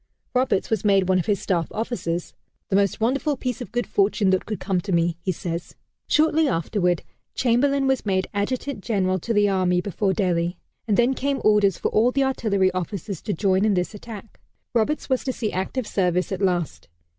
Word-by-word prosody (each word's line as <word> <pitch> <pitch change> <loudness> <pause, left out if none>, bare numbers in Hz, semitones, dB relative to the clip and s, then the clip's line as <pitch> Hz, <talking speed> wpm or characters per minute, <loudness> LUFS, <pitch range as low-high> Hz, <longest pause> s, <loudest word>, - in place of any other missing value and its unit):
Roberts 250 -6 +1
was 220 -4 0
made 195 -3 +3
one 185 -1 +3
of 175 - -3
his 205 -2 +1
staff 170 -4 0
officers 210 -7 -3 0.4
"the 195 - +1
most 200 -1 +2
wonderful 275 +5 0
piece 250 -2 -3
of 200 - -7
good 245 +1 -1
fortune 200 -1 +2
that 185 - 0
could 215 - -3
come 185 -2 -1
to 195 - -5
me," 170 -1 +2
he 185 - -1
says. 170 0 -5 0.3
Shortly 315 0 +3
afterward, 180 - 0 0.3
Chamberlain 270 +3 +2
was 265 -1 +1
made 190 -2 0
Adjutant 225 +2 -2
General 190 -4 0
to 230 - -4
the 205 -2 +4
Army 185 -2 +2
before 195 +1 -1
Delhi, 175 -3 0 0.3
and 210 - +2
then 245 +2 +4
came 275 +1 -1
orders 205 -4 +4
for - - -1
all 225 +3 +3
the 275 +1 +1
artillery 200 -8 +1
officers 185 0 -4
to 210 - -2
join 190 +2 +2
in 215 -2 +3
this 180 +3 -1
attack. 215 0 -10 0.3
Roberts 240 +6 0
was 260 -2 0
to 260 - -1
see 225 -4 -3
active 195 +7 -2
service 180 -2 0
at 190 0 -3
last. 175 - -1
200 Hz, 195 wpm, -23 LUFS, 185-235 Hz, 0.4 s, the